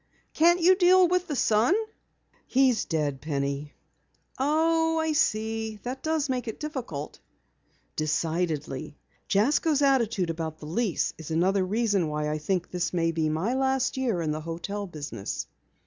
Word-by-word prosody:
"Can't 345 Hz, +3 st, +4 dB
you 360 Hz, +2 st, +6 dB
deal 365 Hz, 0 st, +6 dB
with 360 Hz, +1 st, 0 dB
the 295 Hz, -, -2 dB
son?" 230 Hz, -, +3 dB, 0.7 s
"He 265 Hz, 0 st, +4 dB
is 225 Hz, -, -1 dB
dead, 145 Hz, -5 st, -1 dB
Penny." 140 Hz, -1 st, -3 dB, 0.6 s
"Oh, 325 Hz, +3 st, +2 dB
I 320 Hz, 0 st, +1 dB
see. 220 Hz, -6 st, 0 dB
That 255 Hz, +2 st, -5 dB
does 315 Hz, -1 st, 0 dB
make 255 Hz, -3 st, -2 dB
it 225 Hz, -, -5 dB
difficult." 245 Hz, -, -5 dB, 0.8 s
"Decidedly. 155 Hz, -3 st, -2 dB, 0.3 s
Jasko's 285 Hz, +8 st, +2 dB
attitude 230 Hz, -10 st, +2 dB
about 160 Hz, -1 st, -5 dB
the 155 Hz, -, -11 dB
lease 185 Hz, +4 st, -1 dB
is 160 Hz, -, -8 dB
another 185 Hz, +4 st, +2 dB
reason 205 Hz, -2 st, +1 dB
why 150 Hz, 0 st, -2 dB
I 155 Hz, -, -2 dB
think 180 Hz, +3 st, -2 dB
this 180 Hz, -1 st, -1 dB
will 165 Hz, -2 st, +1 dB
be 160 Hz, -1 st, 0 dB
my 165 Hz, +10 st, -1 dB
last 265 Hz, 0 st, +1 dB
year 235 Hz, -10 st, 0 dB
in 155 Hz, -, -1 dB
the 155 Hz, +1 st, -3 dB
hotel 175 Hz, +6 st, -5 dB
business." 145 Hz, -, -5 dB
205 Hz, 150 wpm, -27 LUFS, 160-270 Hz, 0.8 s, you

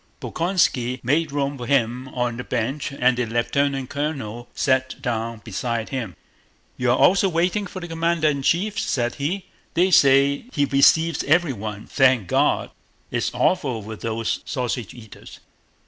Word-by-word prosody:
Bolkónski 150 Hz, -8 st, 0 dB
made 150 Hz, +5 st, +1 dB
room 140 Hz, -1 st, -2 dB
for 120 Hz, -, -6 dB
him 125 Hz, -1 st, +1 dB
on 125 Hz, -2 st, -2 dB
the 125 Hz, -, -5 dB
bench 130 Hz, +5 st, -2 dB
and 130 Hz, -2 st, +2 dB
the 125 Hz, 0 st, -1 dB
lieutenant 135 Hz, +3 st, -1 dB
colonel 135 Hz, -6 st, -4 dB
sat 130 Hz, 0 st, 0 dB
down 115 Hz, -1 st, -3 dB
beside 115 Hz, +1 st, -3 dB
him. 115 Hz, -, -4 dB, 0.6 s
"You're 125 Hz, 0 st, +1 dB
also 195 Hz, +1 st, +4 dB
waiting 180 Hz, +4 st, 0 dB
for 185 Hz, -, -7 dB
the 175 Hz, -, -6 dB
commander 165 Hz, -1 st, 0 dB
in 140 Hz, -2 st, 0 dB
chief?" 200 Hz, +9 st, +1 dB
said 120 Hz, -2 st, -1 dB
he. 180 Hz, +7 st, -2 dB, 0.3 s
"They 185 Hz, +2 st, +3 dB
say 140 Hz, +1 st, +4 dB
he 145 Hz, -2 st, +2 dB
weceives 160 Hz, +3 st, +4 dB
evewyone, 120 Hz, -, 0 dB
thank 130 Hz, -7 st, +3 dB
God!... -, -, +1 dB, 0.4 s
It's -, -, 0 dB
awful 130 Hz, -, +1 dB
with 110 Hz, +1 st, -8 dB
those 115 Hz, 0 st, -2 dB
sausage 125 Hz, -5 st, -3 dB
eaters! 110 Hz, -3 st, -13 dB
135 Hz, 145 wpm, -22 LUFS, 120-155 Hz, 0.6 s, also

